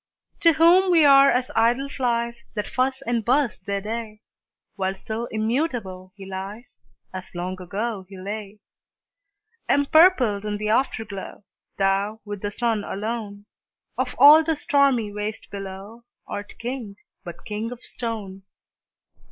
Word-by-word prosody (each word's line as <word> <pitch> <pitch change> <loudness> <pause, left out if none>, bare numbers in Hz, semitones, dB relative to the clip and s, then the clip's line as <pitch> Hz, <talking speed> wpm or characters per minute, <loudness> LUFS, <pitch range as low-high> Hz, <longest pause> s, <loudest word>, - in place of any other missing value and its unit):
To 335 -1 +5
whom 345 +4 +5
we 330 -4 +5
are 275 0 +7
as 250 -1 0
idle 240 +4 +2
flies, 235 -3 -2
That 210 - -2
fuss 265 +1 -1
and 235 -3 -1
buzz 260 +1 +1
their 200 +1 -3
day; 215 0 -5 0.5
While 190 -1 -2
still 220 +4 -5
immutable 220 - -2
he 195 -1 -10
lies, 195 +5 -8 0.3
As 185 -1 -8
long 185 +1 -4
ago 195 +2 -4
he 195 - -10
lay. 205 +2 -7 1.1
Empurpled 285 - +4
in 210 -1 -3
the 210 0 -3
Afterglow, 220 -5 -2 0.3
Thou, 200 +2 0
with 205 -2 -6
the 205 - -2
Sun 225 0 -1
alone, 205 0 -5 0.5
Of 255 -1 -2
all 295 +4 +9
the 320 0 0
stormy 275 -8 +2
waste 210 +1 -5
below, 195 +3 -8 0.2
Art 205 0 -7
King, 235 -4 -5 0.3
but 175 -3 -10
king 215 +2 -4
of 245 - -10
stone! 210 -5 -6
220 Hz, 135 wpm, -24 LUFS, 200-255 Hz, 1.1 s, all